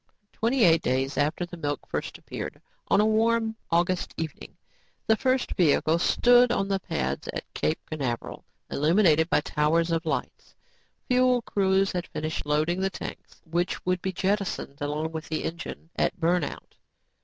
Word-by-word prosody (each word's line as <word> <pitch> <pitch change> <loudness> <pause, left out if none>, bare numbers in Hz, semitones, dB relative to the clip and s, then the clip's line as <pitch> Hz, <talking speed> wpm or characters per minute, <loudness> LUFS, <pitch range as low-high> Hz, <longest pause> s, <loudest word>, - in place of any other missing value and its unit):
Twenty 235 +2 +1
eight 165 -3 +5
days 130 +2 0
after 155 +5 0
the 175 0 -10
milk 145 -4 -3
first - - -4
appeared, - - -7 0.3
on - - +4
a 210 - +4
warm 225 +1 +2
August 175 +1 0
evening, 160 -3 -6 0.5
the 220 - +4
first 260 +2 0
vehicle 160 -1 +3
stood 245 +6 +5
on 195 -5 0
the 195 -1 0
pads 65 - -3
at - - -4
Cape 75 +1 0
Canaveral, 135 -7 -4 0.3
illuminated 160 +1 +3
by 150 - +3
towers 160 +3 +1
of 165 0 -1
lights. 155 - -4 0.5
Fuel 250 -1 +3
crews 195 -1 +2
had 180 -1 -3
finished 155 -1 -4
loading 155 +4 +1
the 195 - +1
tanks - - -9
which 175 +2 -2
would 180 -1 0
be 190 - -2
jettisoned 190 -7 -2
along 150 +2 -2
with 160 -1 -6
the 155 - -2
engine 165 0 -6
at - - 0
burn 175 +1 +2
out. 140 - -7
170 Hz, 160 wpm, -26 LUFS, 155-200 Hz, 0.5 s, eight